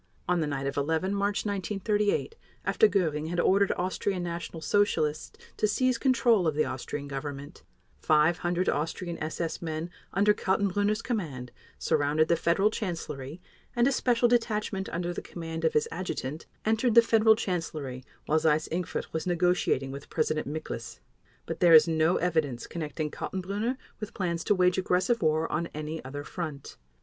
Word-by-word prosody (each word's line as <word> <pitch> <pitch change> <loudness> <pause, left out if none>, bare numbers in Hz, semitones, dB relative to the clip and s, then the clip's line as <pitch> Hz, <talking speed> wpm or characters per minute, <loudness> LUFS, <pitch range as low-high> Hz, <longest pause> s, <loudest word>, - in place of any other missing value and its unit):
On 180 0 +2
the 155 - 0
night 140 -2 -3
of 140 +1 -3
11 160 +6 0
March 200 +1 0
1938, 205 - 0 0.3
after 440 - +4
Göring 155 -5 0
had 175 0 -2
ordered 195 +3 +3
Austrian 185 0 -1
National 170 -1 -5
Socialists 160 -3 0 0.2
to 215 - +2
seize 250 +3 +1
control 235 - +3
of 155 - 0
the 155 - +2
Austrian 140 +2 -5
Government, 140 +1 -6 0.4
500 170 +3 +2
Austrian 165 +3 -2
SS 160 +1 -3
men 165 +1 -4 0.2
under 205 +2 +4
Kaltenbrunner's 205 +2 0
command 145 - -3 0.3
surrounded 150 +2 +1
the 170 - +5
Federal 175 +6 +2
Chancellery 165 - -5 0.4
and 240 +1 +4
a - - +3
special 245 -2 +2
detachment 215 -5 0
under 175 +1 -2
the - - -5
command 165 -1 -6
of 160 - +2
his 150 - +2
adjutant 165 -4 -4 0.2
entered 225 +2 +2
the 235 - +9
Federal 220 -1 +5
Chancellery 155 - -4 0.2
while 155 +1 +2
Seyss 155 -1 +2
Inquart 175 +1 -3
was 160 +2 -2
negotiating 175 -6 +1
with 140 +1 -9
President 155 -2 0
Miklas. 145 -6 -6 0.5
But - - -5
there 170 -2 +7
is 155 0 +8
no 160 +1 +2
evidence 155 -9 0
connecting 155 -2 -4
Kaltenbrunner 200 +7 -3 0.2
with 215 0 -7
plans 170 -3 -2
to 205 - +3
wage 180 0 +3
aggressive 185 +5 +1
war 155 +1 +2
on 165 +2 -1
any 155 +1 -5
other 145 +3 -6
front. 155 -4 -6
170 Hz, 160 wpm, -28 LUFS, 155-200 Hz, 0.5 s, the